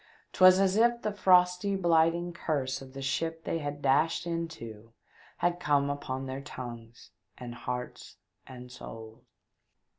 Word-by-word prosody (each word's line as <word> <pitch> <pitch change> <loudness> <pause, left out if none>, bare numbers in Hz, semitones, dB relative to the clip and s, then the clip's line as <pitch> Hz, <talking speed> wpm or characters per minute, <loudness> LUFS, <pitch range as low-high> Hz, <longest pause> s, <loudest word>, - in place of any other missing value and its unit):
'Twas 185 0 +7
as 195 0 +2
if 235 +1 +3
the 215 - 0
frosty, 185 0 +3
blighting 170 -1 +2
Curse 140 -7 -2
of 130 -1 -12
the 135 0 -7
ship 165 +4 -2
they 165 - -2
had 145 -1 -5
dashed 145 +6 +2
into 115 -11 -6 0.4
had 175 0 0
come 145 -3 +2
upon 135 -2 -4
their 130 +1 -5
tongues, 120 -6 -9 0.3
and 120 -1 -7
hearts 125 +1 -6 0.3
and 125 -1 -11
souls. 110 -2 -10
145 Hz, 140 wpm, -29 LUFS, 125-175 Hz, 0.4 s, Twas